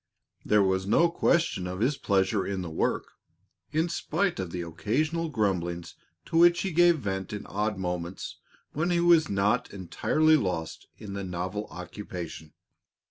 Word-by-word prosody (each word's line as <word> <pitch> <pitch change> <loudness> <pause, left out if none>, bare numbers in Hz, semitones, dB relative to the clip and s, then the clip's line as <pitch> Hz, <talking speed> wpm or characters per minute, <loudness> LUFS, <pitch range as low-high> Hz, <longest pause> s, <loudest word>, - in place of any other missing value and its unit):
There 105 -1 +4
was 95 0 0
no 165 +11 +4
question 165 - +1
of 90 +1 -5
his 130 +7 +2
pleasure 95 -3 +1
in 95 -2 -3
the 85 - -6
work, 80 - -1 0.6
in 160 +3 +1
spite 185 - -1
of 95 -2 -3
the 90 0 -4
occasional 150 - -1
grumblings 85 - -1 0.3
to 165 - -1
which 175 0 +6
he 195 - -1
gave 175 0 +5
vent 95 -6 -3
in 105 - -5
odd 105 0 -2
moments 90 -1 -4 0.4
when 155 +4 0
he 175 -1 +2
was 170 -2 +5
not 100 +1 +1
entirely 155 - +2
lost 90 - -3
in 105 -3 -8
the 100 0 -4
novel 90 +3 -4
occupation. 90 -3 -8
100 Hz, 155 wpm, -28 LUFS, -, 0.6 s, which